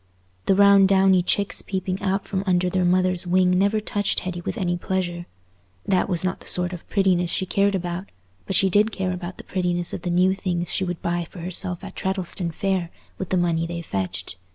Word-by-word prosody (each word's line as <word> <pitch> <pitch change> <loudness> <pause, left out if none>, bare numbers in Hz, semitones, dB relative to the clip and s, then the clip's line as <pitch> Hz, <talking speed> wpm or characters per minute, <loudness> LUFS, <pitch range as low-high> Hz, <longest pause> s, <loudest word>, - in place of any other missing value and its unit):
The 195 - +4
round 200 -1 +6
downy 190 -1 +5
chicks 200 +3 0
peeping 190 -1 -3
out 195 0 -1
from 190 -1 -2
under 180 0 +2
their 185 0 +1
mother's 185 0 +2
wing 180 0 +3
never 200 +4 +2
touched 205 -1 -1
Hetty 180 -1 -5
with 175 - -4
any 175 -4 0
pleasure; 175 -1 -3 0.6
that 190 0 +1
was 175 -3 0
not 185 0 -1
the - - -14
sort 180 0 +1
of 175 - -10
prettiness 185 -4 +2
she 190 - 0
cared 200 +2 +1
about, 180 +1 -4 0.4
but 195 - -1
she 195 - +5
did 210 +4 +3
care 190 -3 -2
about 180 0 -6
the - - -10
prettiness 175 -2 -1
of - - -4
the 175 - -3
new 180 +2 +3
things 175 -3 -2
she - - +1
would 175 -3 -4
buy 175 -1 -1
for 180 - -10
herself 180 0 -1
at - - -9
Treddleston 190 -2 -2
Fair 185 0 -1 0.3
with 190 - -4
the 185 - +1
money 165 -1 +1
they 170 0 -5
fetched. 95 - -4
185 Hz, 210 wpm, -23 LUFS, 175-190 Hz, 0.6 s, round